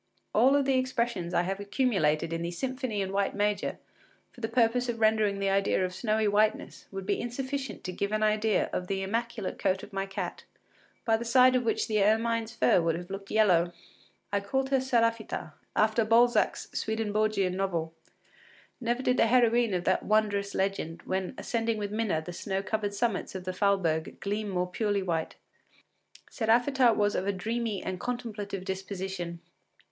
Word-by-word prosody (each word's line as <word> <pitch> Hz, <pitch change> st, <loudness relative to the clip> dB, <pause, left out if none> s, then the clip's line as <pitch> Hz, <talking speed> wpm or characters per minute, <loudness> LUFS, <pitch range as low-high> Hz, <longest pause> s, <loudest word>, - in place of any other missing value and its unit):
All 275 Hz, +3 st, +5 dB
the 265 Hz, -1 st, +2 dB
expressions 235 Hz, -8 st, -1 dB
I 175 Hz, -1 st, +2 dB
have 195 Hz, +2 st, -3 dB
accumulated 200 Hz, -, +1 dB
in 165 Hz, -, -2 dB
the 170 Hz, -, -2 dB
“Symphony 255 Hz, +3 st, -3 dB
in 190 Hz, 0 st, -2 dB
White 200 Hz, 0 st, 0 dB
Major” 205 Hz, 0 st, 0 dB, 0.5 s
for 245 Hz, -, -15 dB
the 225 Hz, -, -2 dB
purpose 245 Hz, +1 st, +2 dB
of 230 Hz, -1 st, -2 dB
rendering 215 Hz, -2 st, +3 dB
the 195 Hz, 0 st, 0 dB
idea 195 Hz, -1 st, +2 dB
of 180 Hz, -, -5 dB
snowy 215 Hz, +2 st, 0 dB
whiteness 210 Hz, +1 st, 0 dB
would 195 Hz, -1 st, -6 dB
be -, -, 0 dB
insufficient 265 Hz, +1 st, -4 dB
to 185 Hz, -, -4 dB
give 200 Hz, +3 st, -2 dB
an 215 Hz, 0 st, 0 dB
idea 215 Hz, 0 st, +2 dB
of 180 Hz, -, -2 dB
the 195 Hz, 0 st, -2 dB
immaculate 230 Hz, 0 st, -3 dB
coat 190 Hz, -1 st, 0 dB
of 205 Hz, -, -11 dB
my 195 Hz, 0 st, -2 dB
cat, 195 Hz, -3 st, -5 dB, 0.6 s
by 225 Hz, -1 st, +3 dB
the 230 Hz, -, -5 dB
side 255 Hz, +2 st, +5 dB
of 255 Hz, -, +3 dB
which 225 Hz, -, 0 dB
the 215 Hz, -2 st, +1 dB
ermine’s 225 Hz, +2 st, +1 dB
fur 180 Hz, -, +4 dB
would 165 Hz, -1 st, +1 dB
have 175 Hz, +2 st, -7 dB
looked 195 Hz, 0 st, -6 dB
yellow. 180 Hz, -5 st, +3 dB, 0.6 s
I 200 Hz, -, +3 dB
called 265 Hz, +7 st, -1 dB
her 270 Hz, -, +4 dB
Séraphita, 230 Hz, -9 st, 0 dB, 0.2 s
after 220 Hz, +1 st, +3 dB
Balzac’s 235 Hz, +2 st, +3 dB
Swedenborgian 215 Hz, -3 st, 0 dB
novel. 170 Hz, -4 st, -2 dB, 0.9 s
Never 240 Hz, +1 st, -1 dB
did 250 Hz, 0 st, +2 dB
the -, -, +4 dB
heroine 235 Hz, -3 st, +3 dB
of 175 Hz, -, -1 dB
that 185 Hz, -, +2 dB
wondrous 205 Hz, -2 st, +1 dB
legend, 190 Hz, -4 st, -2 dB
when 190 Hz, +5 st, -3 dB
ascending 230 Hz, -1 st, -1 dB
with 205 Hz, -1 st, -3 dB
Minna 210 Hz, -7 st, 0 dB
the 175 Hz, -, -6 dB
snow 195 Hz, +2 st, -3 dB
covered 205 Hz, -1 st, -2 dB
summits 210 Hz, -3 st, -1 dB
of 185 Hz, -, -5 dB
the 185 Hz, 0 st, -3 dB
Falberg, 185 Hz, -5 st, 0 dB
gleam 205 Hz, +1 st, -2 dB
more 180 Hz, -2 st, 0 dB
purely 200 Hz, +2 st, -1 dB
white. 165 Hz, -3 st, -2 dB, 1.0 s
Séraphita 240 Hz, +1 st, +3 dB
was 205 Hz, 0 st, +2 dB
of 190 Hz, -, -1 dB
a -, -, +3 dB
dreamy 220 Hz, +2 st, -3 dB
and 185 Hz, -1 st, -4 dB
contemplative 215 Hz, -6 st, -4 dB
disposition. 190 Hz, -3 st, -5 dB
210 Hz, 175 wpm, -29 LUFS, 190-230 Hz, 1.0 s, All